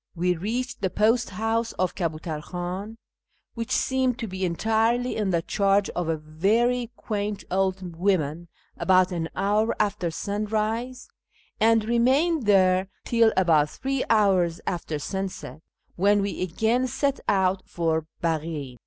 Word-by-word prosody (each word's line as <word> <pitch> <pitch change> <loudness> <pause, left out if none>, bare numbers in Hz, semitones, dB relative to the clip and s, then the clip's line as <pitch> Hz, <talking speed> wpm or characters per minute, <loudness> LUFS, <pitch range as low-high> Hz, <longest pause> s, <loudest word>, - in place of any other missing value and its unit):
We 180 +1 +1
reached 245 +8 -3
the 190 - +1
post 225 +4 +2
house 225 +3 -1
of 185 -1 -1
Kabutar 160 -3 -3
Khan 185 +6 -5 0.6
(which 230 -1 -5
seemed 260 -2 +1
to 235 -4 -4
be 190 -1 -5
entirely 225 +7 +1
in 210 -3 -1
the 170 -2 +1
charge 200 +1 +1
of 175 -2 -3
a 160 - 0
very 220 +11 +1
quaint 210 -3 -3
old 190 -2 -1
woman) 170 -3 0 0.3
about 185 0 +3
an 165 -2 -3
hour 210 +4 +1
after 200 -4 0
sunrise, 215 +7 -2 0.5
and 225 0 +4
remained 260 +5 +2
there 185 -2 +4 0.2
till 230 -2 +4
about 160 -5 +4
three 270 - -2
hours 190 -6 +3
after 165 -3 -3
sunset, 185 -4 -5 0.4
when 200 +2 +3
we 200 - -3
again 220 +8 +1
set 270 +2 -1
out 190 -1 +2
for 160 -2 -1 0.2
Baghin. 155 -6 -2
195 Hz, 135 wpm, -25 LUFS, 175-225 Hz, 0.6 s, and